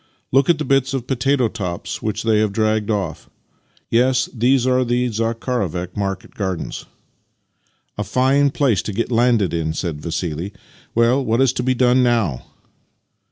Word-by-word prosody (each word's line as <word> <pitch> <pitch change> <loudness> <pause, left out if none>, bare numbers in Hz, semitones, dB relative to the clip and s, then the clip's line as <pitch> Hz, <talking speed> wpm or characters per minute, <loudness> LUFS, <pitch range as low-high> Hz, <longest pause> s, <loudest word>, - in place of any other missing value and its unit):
Look 135 +3 +3
at 170 - +4
the 150 - -3
bits 135 -1 +1
of 125 -3 -3
potato 130 0 +1
tops 90 -6 -5
which 110 -1 -2
they 110 -2 +3
have 105 -1 +1
dragged 110 0 0
off. 95 -7 -3 0.6
Yes, 125 +2 +2
these 125 +1 +2
are 130 0 +3
the 125 +1 0
Zakharovek 110 -6 -2
market 95 -2 -4
gardens." 95 -4 -4 1.1
"A - - 0
fine 130 +7 +2
place 130 -8 +1
to 105 - -5
get 115 +4 -2
landed 115 -6 +2
in!" 80 -2 -1
said 80 -3 -4
Vassili. 85 +3 -3 0.2
" - - -29
Well, 120 +4 +3
what 115 -1 0
is 135 -1 +3
to 125 - -2
be 130 +1 +1
done 125 +1 +4
now? 115 - 0
115 Hz, 160 wpm, -20 LUFS, 100-130 Hz, 1.1 s, at